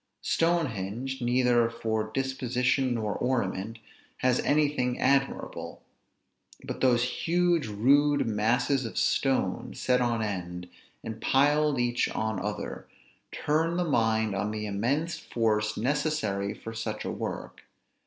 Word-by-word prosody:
Stonehenge, 130 - -1
neither 120 -1 +3
for 110 -2 -2
disposition 130 0 0
nor 105 -3 -1
ornament, 115 -3 -1 0.4
has 125 -1 +2
anything 145 -4 +1
admirable; 135 0 -1 0.8
but - - -6
those 120 -2 +4
huge 170 +2 +1
rude 140 +8 +3
masses 120 +5 +1
of 115 - -6
stone, 135 -1 0
set 125 -1 +1
on 120 -2 +1
end, 90 -3 -4 0.4
and 110 0 -6
piled 145 +1 +3
each 120 0 +1
on 110 -3 -2
other, 105 +2 -5 0.4
turn 165 +3 0
the 180 - +2
mind 110 -7 +1
on 100 +2 -1
the 105 0 -4
immense 130 +12 -1
force 110 -2 0
necessary 110 -6 0
for 115 - -8
such 110 -1 -4
a - - -2
work. - - -5
120 Hz, 120 wpm, -28 LUFS, 110-135 Hz, 0.8 s, those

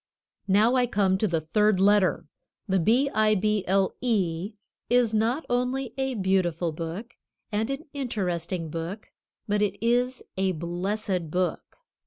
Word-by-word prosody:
Now, 210 +5 +4
I 250 -1 +3
come 195 -4 +1
to 215 - +2
the 165 -4 0
third 210 +5 +2
letter. 200 -3 +3 0.4
The 190 -1 +2
B 235 - +3
I 215 0 +3
B 210 0 +1
L 195 +1 +2
E 195 -5 0 0.4
is 245 -2 +3
not 230 +8 +1
only 250 0 -1
a 265 -1 -1
Beautiful 185 -4 +1
book, 170 +9 -6 0.4
and 215 +3 -1
an 275 +3 -4
Interesting 180 - -3
book, 170 +6 -6 0.4
but 205 0 +1
it 200 -1 0
is 245 +2 +1
a 190 -1 +1
Blessed 180 +2 -2
book. 180 +3 -2
205 Hz, 145 wpm, -26 LUFS, 180-235 Hz, 0.4 s, Now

